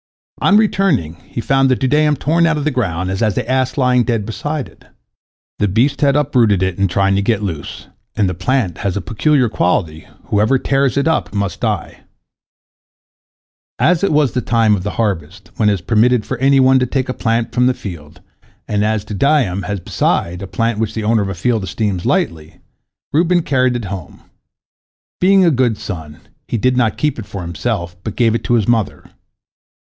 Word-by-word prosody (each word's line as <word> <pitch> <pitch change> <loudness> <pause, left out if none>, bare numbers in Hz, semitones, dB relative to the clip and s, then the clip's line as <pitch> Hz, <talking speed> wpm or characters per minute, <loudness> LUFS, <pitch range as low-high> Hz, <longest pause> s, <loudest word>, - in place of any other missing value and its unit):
On 200 - +5
returning, 195 - +1
he - - -6
found 135 +2 +2
the 130 - +3
dudaim 150 +4 +2
torn 165 +4 +1
out 165 -1 +1
of 150 - -2
the 155 - 0
ground, 95 -8 -2
and 95 - -3
the 110 -1 0
ass 130 +1 0
lying 125 -2 +3
dead 115 -4 -1
beside 145 +6 -4
it. - - -21 0.7
The 105 - +2
beast 130 +8 +1
had 140 -1 +3
uprooted 120 -10 +2
it 95 0 -2
in 100 - +3
trying 95 +2 +1
to - - +1
get 105 0 0
loose, 80 -7 -5 0.3
and 105 - +1
the 90 - -1
plant 95 -1 -1
has 100 -1 -2
a - - 0
peculiar 125 - +1
quality, 85 -6 -1 0.2
whoever 110 +6 +2
tears 135 0 0
it 140 - +1
up 105 - -1
must 100 -1 -2
die. - - -2 1.8
As 180 +1 +2
it 200 - +2
was 150 -4 +2
the 125 - -1
time 115 -2 +2
of 95 - -4
the 105 - -3
harvest, 95 -3 -3
when 105 -2 +3
it - - +3
is 95 - -3
permitted 115 +4 +2
for 130 - -4
any 135 +1 +4
one 130 0 +5
to 125 - 0
take 130 +1 -1
a 130 - -2
plant 115 -1 -1
from 125 +1 +3
a - - +1
field, 85 -3 -9 0.5
and 105 0 0
as 105 -1 0
dudaim 105 -3 +1
is, 100 -1 -2
besides, 90 0 -1
a 100 - -6
plant 115 0 -1
which 110 -2 -2
the 110 - -3
owner 110 0 +2
of 100 - -2
a 95 - -4
field 110 +3 0
esteems 95 -1 -2
lightly, 80 -2 -2 0.5
Reuben 170 +2 +2
carried 130 -3 +1
it 120 -3 -3
home. 95 -3 -8 1.0
Being 190 +1 +4
a 170 - +4
good 125 -5 +1
son, 80 -6 -8 0.3
he - - -2
did 125 +3 +1
not 120 -4 +1
keep 150 -5 -1
it 105 - -8
for 100 - -6
himself, 85 +1 -3
but 110 - -5
gave 115 -3 +2
it 115 - -2
to 120 - +2
his 110 -4 +1
mother. 115 -3 -1
115 Hz, 200 wpm, -17 LUFS, 100-130 Hz, 1.8 s, On